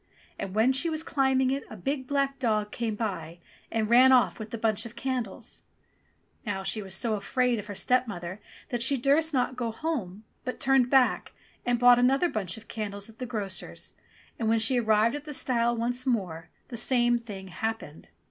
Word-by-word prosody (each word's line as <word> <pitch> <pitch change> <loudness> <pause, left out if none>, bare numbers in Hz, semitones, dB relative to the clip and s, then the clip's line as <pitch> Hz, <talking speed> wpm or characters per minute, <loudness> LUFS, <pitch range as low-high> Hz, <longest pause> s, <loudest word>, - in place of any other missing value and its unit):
And 195 0 -5
when 230 +5 +4
she 300 +6 +2
was 315 0 0
climbing 265 -3 +2
it 275 +1 -2
a 220 - -9
big 265 +6 -3
black 275 -1 0
dog 215 -4 0
came 230 -3 -2
by 180 -7 -4 0.3
and 220 -1 0
ran 250 +3 +7
off 250 -2 +4
with 220 0 -6
the 230 - -5
bunch 220 -1 +1
of 235 0 -9
candles! 245 -4 -4 0.8
Now 200 -4 -3
she 215 +2 -1
was 190 -2 -6
so 230 +1 0
afraid 240 +3 0
of 210 - -8
her 205 - -6
stepmother 205 -6 -1 0.3
that 240 -1 -2
she 270 +3 +3
durst 285 +6 +3
not 255 -2 0
go 240 -2 -2
home, 225 - -4 0.2
but 255 - -4
turned 265 -2 +3
back 265 -2 +3 0.3
and 245 0 +3
bought 245 0 +7
another 270 +8 +3
bunch 195 - -3
of 225 - -13
candles 205 -1 -5
at 220 - -25
the 250 - -4
grocer's, 205 -5 -5 0.5
and 225 -2 0
when 225 - +4
she 225 +3 +3
arrived 220 0 +3
at 290 0 -7
the 300 -2 -5
stile 235 -2 +1
once 245 +3 -1
more, 180 -9 -1 0.2
the 240 - -6
same 240 0 +2
thing 200 -5 -9
happened. 220 -5 -5
235 Hz, 195 wpm, -28 LUFS, 210-260 Hz, 0.8 s, ran